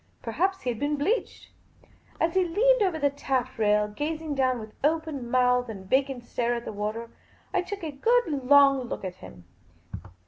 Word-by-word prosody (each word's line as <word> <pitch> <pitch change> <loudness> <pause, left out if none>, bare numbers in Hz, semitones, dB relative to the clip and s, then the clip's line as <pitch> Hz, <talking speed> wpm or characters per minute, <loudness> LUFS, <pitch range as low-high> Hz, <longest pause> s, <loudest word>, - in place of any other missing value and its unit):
Perhaps 370 - -1
he 250 - -1
had 225 - -6
been 290 +1 0
bleached. 360 +13 -2 0.7
As 330 0 +1
he 375 - +3
leant 445 +8 +3
over 370 -5 +1
the 285 -2 +1
taff 260 -3 -2
rail, 210 -1 +3
gazing 305 +7 -4
down 260 -2 +1
with 215 -2 -9
open 305 -5 -1
mouth 250 -1 +2
and 195 -4 -8
vacant 265 +1 +1
stare 240 0 -1
at 235 - -5
the - - -5
water, 215 +3 -4 0.4
I 375 - +2
took 390 +1 -7
a 315 - -3
good, 470 - +2 0.2
long 280 -2 +6
look - - -5
at 185 -1 -6
him. 90 - -13
275 Hz, 180 wpm, -27 LUFS, 235-325 Hz, 0.7 s, long